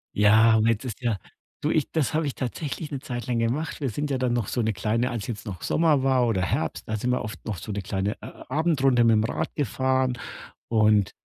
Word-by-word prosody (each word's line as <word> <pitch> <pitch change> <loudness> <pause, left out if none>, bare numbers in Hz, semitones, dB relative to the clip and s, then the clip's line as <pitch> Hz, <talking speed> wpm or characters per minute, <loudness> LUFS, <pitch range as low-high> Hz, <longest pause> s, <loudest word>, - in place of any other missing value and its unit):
Ja, 110 +2 +6
und 110 0 +3
jetzt 115 0 +1
ist 120 -2 -6
ja 115 -4 0 0.5
Du, 150 - +1
ich 155 -2 +1
das 155 -1 0
habe 160 0 +1
ich 140 - -2
tatsächlich 145 +4 -4
'ne 140 - -3
Zeit 120 -1 -5
lang 125 -2 0
gemacht. 125 +8 -1
Wir 135 - 0
sind 145 +6 -3
ja 135 - 0
dann 125 -1 0
noch 120 -4 0
so 125 - -1
'ne 110 0 +1
kleine 110 +6 0
als 115 -4 -4
jetzt 105 -5 -5
noch 95 -4 -6
Sommer 160 -4 +2
war 130 -2 +3
oder 110 -6 +1
Herbst, 90 - -2
da 110 - 0
sind 125 +4 -1
wir 125 - +1
oft 105 -3 -7
noch 105 -4 -3
so 105 - -7
'ne 100 -1 -3
kleine 95 +3 -1
A - - -10
Abendrunde 135 -4 +3
mit'm 110 -1 +4
Rad - - -3
gefahren 130 -1 0 0.5
und 105 -3 +3
120 Hz, 235 wpm, -25 LUFS, 110-135 Hz, 0.5 s, Ja